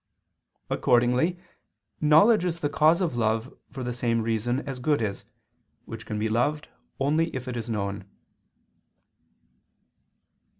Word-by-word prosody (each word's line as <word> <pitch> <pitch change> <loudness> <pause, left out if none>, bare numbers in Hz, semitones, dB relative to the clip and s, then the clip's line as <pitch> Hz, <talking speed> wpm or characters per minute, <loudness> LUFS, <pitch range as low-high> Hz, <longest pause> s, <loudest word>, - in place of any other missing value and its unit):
Accordingly 125 +9 +2 0.6
knowledge 160 +8 +5
is 170 -2 -2
the 145 - 0
cause 155 +5 +3
of 165 -9 -1
love 110 +1 -1 0.2
for 135 -1 -7
the 125 0 -3
same 115 -2 0
reason 115 +3 -1
as 135 -2 -5
good 145 +3 +1
is, 105 -3 -3 0.6
which 115 0 -9
can 105 - -3
be 110 +1 0
loved 145 +8 0 0.3
only 155 +4 +2
if 130 0 -5 0.2
known. 100 -2 -3
125 Hz, 120 wpm, -26 LUFS, 115-150 Hz, 0.6 s, knowledge